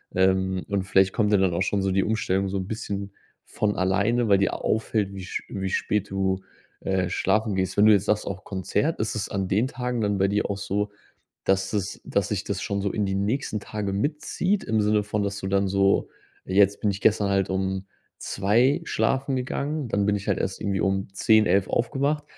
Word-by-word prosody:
Ähm, 95 0 +2
und 100 -2 0
vielleicht 95 0 +3
kommt 105 -2 +1
ja - - +6
dann 95 -2 +2
auch 85 - -1
schon 100 +1 +1
so 95 0 0
die 95 +1 +2
Umstellung 100 -3 0
so 95 - -4
'n 95 - -4
bisschen 100 -3 -4 0.3
von 105 -1 -1
alleine, 100 +6 +1
weil 100 - +6
dir 100 - +1
a - - -3
auffällt, 110 -2 -1
wie 95 -1 -7
sch - - -4
wie 95 -1 -3
spät 100 +1 -1
du, 95 -1 0 0.4
äh, 95 -2 -1
schlafen 110 -1 +1
gehst. 95 -1 -1
Wenn 105 +1 +5
du - - +8
jetzt 100 -1 +4
sagst: 105 0 +1
„Auch 95 -1 -6
Konzert“, 95 - -1
ist 110 - -2
es 110 - -2
an 95 -2 -2
den 105 +6 +2
Tagen 125 -2 -3
dann 105 -2 0
bei 95 0 +2
dir 105 +1 0
auch 100 - -2
so, 105 +1 -2 0.5
dass 95 +1 +1
es 100 -2 -2
dass 100 -2 0
sich 105 -2 -2
das 100 -2 -3
schon 100 0 -2
so 100 0 -1
in 105 - 0
die 95 0 -1
nächsten 105 +2 -1
Tagen 100 -2 -3
mitzieht 170 - -1
im 110 0 0
Sinne 105 0 +2
von, 105 0 -2
dass 100 0 -2
du 95 - -4
dann 100 0 +1
so: 100 +1 +2 0.4
„Jetzt 100 +1 +3
bin 105 - +1
ich 100 +1 -6
gestern 105 -2 +3
halt 95 -1 +1
um 95 0 -1 0.3
2:00 120 - +2
schlafen 135 -3 0
gegangen. 140 +2 -2
Dann 100 -1 +1
bin 105 - +3
ich 100 -1 -5
halt - - +1
erst 95 - -2
irgendwie 100 -2 -1
um 95 0 0
10:00, 110 +2 +4
11:00 95 -1 +2
aufgewacht“, 140 +5 0
100 Hz, 220 wpm, -25 LUFS, 95-110 Hz, 0.5 s, du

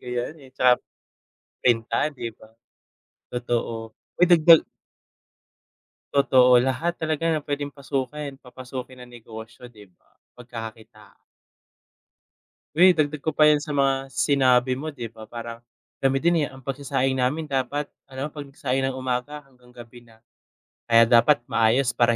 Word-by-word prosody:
kaya 125 -1 -3 0.2
eh, 135 - -15
tsaka, 125 -1 +3 0.8
printan 120 +5 +1
di 120 -3 -5
ba? 110 0 -19 0.8
Totoo, 115 -2 -3 0.3
uy 180 - +7
dagdag 165 -1 +7 1.5
Totoo 125 -3 +5
lahat 135 +7 -1
talaga 160 -1 -2
ng 155 -3 0
pwedeng 145 0 -4
pasukin 140 0 -4
papasukin 130 0 -9
ng 125 - -13
negosyo 115 +2 -11
di 110 -4 -16
ba? 85 - -36 0.2
Pagkaka-kitaan. 115 -3 -10 1.6
Uy 185 +2 +7
dagdag 150 -3 0
ko 160 - 0
pa 155 -1 +4
yan 150 -1 +4
sa 150 - -8
mga 135 -1 0
sinabi 130 0 +2
mo 155 +5 -5
di 125 -5 -7
ba 110 -1 -13
parang, 115 0 -8 0.4
kami 135 0 +2
din 170 +1 +2
eh, 145 - 0
ang 135 - -13
pagsasaing 135 0 -2
namin 130 +5 -1
dapat 140 +1 -2 0.2
alam 135 +2 -4
mo - - -8
pag 150 - -6
nag-saing 135 -1 -2
ng 130 - -6
umaga 130 +3 -4
hanggang 125 -2 -23
gabi 120 0 -13
na. 115 -2 -21 0.7
Kaya 115 0 +6
dapat 120 +3 +4
maayos 115 +3 +3
para 120 -1 +2
130 Hz, 145 wpm, -24 LUFS, 120-145 Hz, 1.6 s, uy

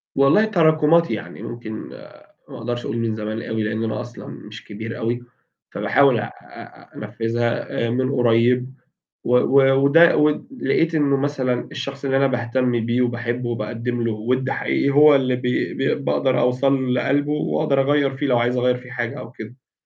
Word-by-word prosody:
والله 140 +11 +4
تراكمات 165 -4 +3
يعني، - - -6
ممكن 120 -2 -7 0.8
ما - - -9
أقدرش 120 +1 -4
أقول 115 - -3
من 115 -1 -1
زمان 110 +1 -4
أوي، 110 -1 -3
لأن 110 +1 -2
أنا 110 - -3
أصلًا 120 - -10
مش 110 +2 -11
كبير 110 +2 -7
أوي، 120 +2 -2 0.5
فباحاول 135 -4 +2
أ - - -2
أ - - -14
أنفذها 115 0 -2
من 130 +3 0
قريب، 125 +1 +2 0.5
و 125 - +1
و 135 +1 +4
وده 165 +4 +6
ود 150 +7 +1
لقيت 165 0 +1
إنه 145 -3 +2
مثلًا 135 -3 -2
الشخص 140 -1 -6
اللي 135 -1 +1
أنا 135 0 +3
باهتم 120 -1 -1
بيه 120 +1 +1
وباحبه 120 0 -2
وباقدم 120 +1 -3
له 115 - 0
وِد 125 +5 -1
حقيقي 140 - 0
هو 150 +1 +6
اللي 130 -2 +1
ب 125 - -9 0.4
ب 135 +1 -1
باقدر 130 -2 +1
أوصل 130 +1 +1
لقلبه 145 +3 0
وأقدر 150 -1 0
أغيّر 140 -1 +1
فيه 145 - -2
لو 125 -3 +2
عايز 120 +1 0
أغير 125 0 +2
فيه 125 0 -12
حاجة 120 -2 -4
أو - - -9
كده.ف 120 +4 -12
125 Hz, 170 wpm, -21 LUFS, 120-140 Hz, 0.8 s, وده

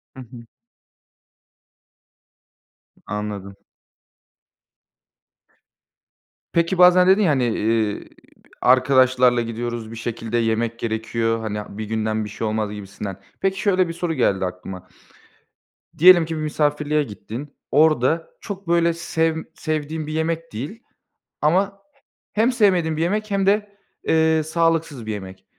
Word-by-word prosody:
Hı - - -11
hı. 120 -1 -12 2.5
I - - -27
anladım. 100 -2 -5 3.0
Peki, 170 +2 +1
bazen 180 0 +7
dedin 190 +3 +5
ya, 180 -7 +3
hani, 135 -3 +1
eee, 110 -2 0 0.5
"Arkadaşlarla 130 -1 +4
gidiyoruz, 115 -1 -4
bir - - -8
şekilde 115 0 -3
yemek 115 0 0
gerekiyor. 115 0 -1
Hani, 105 -2 -5
bir 110 - -4
günden 110 0 -1
bir - - -7
şey 110 +1 -4
olmaz." 110 -1 -1
gibisinden. 100 -1 -7 0.2
Peki, 195 0 0
şöyle 190 -3 +2
bir 165 - -5
soru 170 0 -2
geldi 95 -10 +1
aklıma. 90 0 -7 1.1
Diyelim 175 0 +8
ki 160 0 -4
bir 155 - -3
misafirliğe 150 0 0
gittin. 120 +4 -8 0.2
Orada 155 +1 +3
çok 195 -3 -7
böyle 170 0 +3
sevm 160 -1 -1
sevdiğin 155 0 -3
bir 155 - -5
yemek 165 +1 -2
değil 150 - -6 0.6
ama 185 +7 +2 0.6
he 215 - +1
hem 235 +3 +3
sevmediğin 180 -9 +2
bir - - -1
yemek 210 +5 -1
hem 195 -1 +1
de, 205 0 +1 0.3
eee, 160 0 +3
sağlıksız 165 -5 0
bir 110 - -3
yemek. 95 -2 -9
145 Hz, 125 wpm, -22 LUFS, 110-170 Hz, 3.0 s, Diyelim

